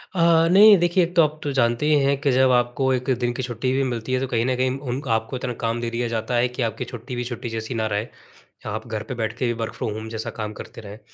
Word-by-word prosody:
अ, 165 -1 +4
नहीं 205 +2 +8
देखिए 175 +1 +2
एक 175 +1 -4
तो 170 - +7
आप 155 0 -1
तो 145 - -2
जानते 120 +4 +2
ही 150 -1 +4
हैं 140 0 +2
कि 140 -3 +2
जब 130 0 +4
आपको 125 +2 +1
1 125 +1 -2
दिन 120 -1 0
की 130 - -4
छुट्टी 125 +1 -2
भी 135 +1 +1
मिलती 115 +2 -4
है 130 - +2
तो 135 - -2
कहीं 115 -2 0
न 130 0 +1
कहीं 130 +1 0
उन 130 -1 -4 0.2
आपको 110 +3 -5
इतना 125 -1 -3
काम 115 +1 -1
दे 120 - -2
दिया 120 +1 -2
जाता 115 +1 -2
है 120 +1 +3
कि - - -1
आपकी 110 - -6
छुट्टी 120 +2 -6
भी 120 - -2
छुट्टी 120 0 -5
जैसी 110 +2 -4
ना 110 -1 0
रहे। 105 +3 -2 0.6
आप 110 +2 -5
घर 110 -1 -4
पे 130 - -6
बैठ 110 -1 -2
के - - -1
भी 120 - +1
वर्क 110 - -4
फ्रॉम 110 - -3
होम 110 +1 -6
जैसा 110 +1 -4
काम 105 0 -3
करते 115 - -10
रहें, 105 +1 -10
120 Hz, 285 wpm, -23 LUFS, 115-135 Hz, 0.6 s, नहीं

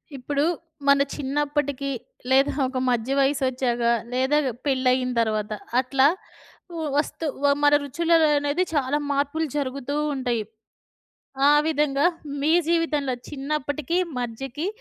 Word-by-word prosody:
ఇప్పుడు 280 +2 -1 0.4
మన 280 0 +6
చిన్నప్పటికి 285 0 -1 0.4
లేదా 270 +2 +4 0.2
ఒక 260 0 -5
మధ్య 240 +1 0
వయసొచ్చాక 260 -3 +1 0.3
లేదా 260 +4 +2 0.3
పెళ్ళయిన 255 -2 +2
తర్వాత 215 -2 -1 0.3
అట్లా 265 +1 +3 0.7
వ 325 - -3
వస్తు 310 +2 -1 0.2
వ - - +3 0.2
మన 290 0 +5
రుచుల 335 +5 0 0.3
అనేది 290 +5 0
చాలా 285 0 +1
మార్పులు 285 +3 0
జరుగుతూ 275 0 -3 0.2
ఉంటాయి. 245 -4 -1 1.1
ఆ! - - +7 0.2
విధంగా 295 -2 +1 0.4
మీ 300 +2 +2 0.2
జీవితంలో 315 -5 +1 0.2
చిన్నప్పటికి, 295 +2 -2 0.2
మధ్యకి, 265 +7 -4
275 Hz, 110 wpm, -24 LUFS, 260-295 Hz, 1.1 s, ఆ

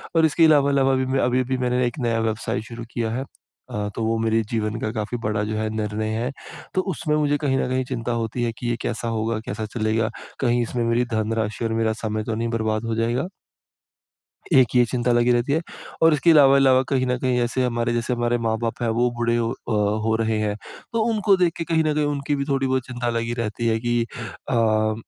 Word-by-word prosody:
और 160 -1 +5
इसके 160 +2 +4
अलावा 145 -3 +5
अलावा 135 -1 +3
भी 130 0 0
मैं 135 +1 0
अभी-अभी 130 +1 +1
मैंने 125 0 +1
एक 140 - -5
नया 115 -2 0
व्यवसाय 110 0 -2
शुरू 115 +1 -8
किया 115 -2 -2
है। 130 +3 -2 0.5
अ, 105 0 -2
तो 115 - -2
वो 115 0 +1
मेरी 115 0 +2
जीवन 110 0 -1
का 110 - -2
काफ़ी 110 +3 -3
बड़ा 105 0 0
जो 110 +1 -3
है 110 0 -1
निर्णय 110 0 -2
है, 125 +3 -2 0.4
तो 185 - +2
उसमें 150 0 -1
मुझे 145 -1 +2
कहीं 135 -3 0
न - - 0
कहीं 130 0 0
चिंता 120 -2 -3
होती 115 +2 -3
है 115 - 0
कि 120 - -4
ये 120 - +1
कैसा 115 +1 -3
होगा, 115 0 -1
कैसा 110 +2 -4
चलेगा, 110 0 0 0.3
कहीं 120 -2 +2
इसमें 120 0 -2
मेरी 115 +1 +1
धनराशि 110 +1 -1
और 115 - -1
मेरा 110 0 +1
समय 110 0 -1
तो 110 0 -3
नहीं 115 +1 -1
बर्बाद 110 0 -1
हो 115 -1 -1
जाएगा? 120 +8 0 1.3
एक 130 -4 +5
ये 120 - +6
चिंता 120 0 0
लगी 120 +1 +3
रहती 120 +4 +1
है। 160 - +2 0.4
और 165 -1 +7
इसके 165 +4 +3
अलावा 140 -3 +7
अलावा 130 -1 +5
कहीं 130 -2 +1
न 125 0 +1
कहीं 125 -1 0
ऐसे 120 +2 0
हमारे 120 -1 0
जैसे 120 +1 -1
हमारे 120 0 +1
माँ-बाप 115 +1 -2
हैं, 115 - +1
वो 120 +2 +2
बूढ़े 120 0 +1
ओ, 115 0 0
अ, 120 - -6 0.3
हो 110 0 +2
रहे 110 -1 +1
हैं। 105 -1 -1 0.4
तो 225 -1 +1
उनको 205 -2 +3
देख 175 -3 +2
के 165 - -3
कहीं 160 -1 +1
न 155 -1 +1
कहीं 150 -1 +1
उनकी 145 0 -1
भी 140 - -1
थोड़ी 135 -1 +1
बहुत 130 -1 0
चिंता 120 -1 -3
लगी 115 0 -2
रहती 115 +2 -3
है 110 0 +2
कि 120 -1 +1 0.5
अ, 110 -2 +2
120 Hz, 230 wpm, -23 LUFS, 110-130 Hz, 1.3 s, और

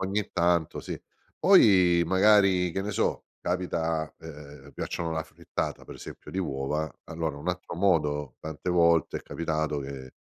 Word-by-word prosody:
ogni 100 +2 -1
tanto, 85 -2 +1
sì. - - -6 0.4
Poi, 90 -4 +6
magari, 95 -2 +4
che 95 +3 -2
ne 105 - -3
so, - - -1
capita, 80 -3 -1
ehm, 75 -2 -11
piacciono 85 -1 -3
la 80 - -1
frittata, 80 - -5
per - - -10
esempio, - - -10
di 95 - -3
uova, 75 -1 -2
allora 80 -3 -3
un 75 +5 -5
altro 90 -1 -4
modo, 75 -7 +1
tante 80 +3 -6
volte 85 -2 +3
è - - -15
capitato, 80 -2 -2
che 65 -1 -7
85 Hz, 150 wpm, -27 LUFS, 75-90 Hz, 0.4 s, Poi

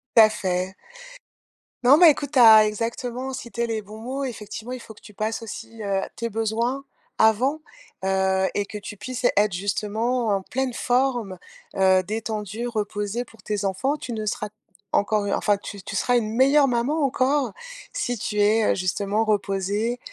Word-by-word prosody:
Ta 220 -1 +8
fait. 185 -3 -2 1.1
Non, 265 +4 +7
mais 335 -2 +9
écoute, 285 -1 -4
tu 265 - +4
as 220 -2 +9
exactement 245 +4 -3
cité 235 -2 -4
les 225 -1 -2
bons 210 +1 -11
mots. 265 +4 -4
Effectivement, 225 -1 -6
il 255 - -5
faut 225 - -11
que - - -20
tu 210 - -14
passes 215 +3 -2
aussi, 225 0 -8
heu, 195 -1 0
tes 230 0 -3
besoins 225 +5 -1 0.3
avant, 245 +8 +3 0.4
heu 190 0 +2
et 205 - -1
que 210 - -7
tu 210 0 -8
puisses 255 +3 -5
être 205 -1 +3
justement 215 +6 -1
en - - -6
pleine 255 +5 -2
forme, 245 -7 0 0.4
heu, 190 -1 +4
détendue, 215 +2 -4
reposée 210 0 -3
pour 225 - -19
tes 205 -2 -3
enfants. 255 +10 0
Tu 250 - -6
ne 215 -1 -3
seras 210 0 -2 0.4
encore, 205 0 +1
enfin 205 -1 +2
tu 200 0 -9
tu 200 - -7
seras 245 +5 +2
une 220 -3 -1
meilleure 275 +4 +5
maman 255 +6 0
encore 265 -2 +1 0.4
si 245 - -2
tu 210 0 -3
es, 215 +2 +4
heu, - - +1
justement 200 +3 0
reposée 205 +3 0
220 Hz, 170 wpm, -24 LUFS, 205-245 Hz, 1.1 s, mais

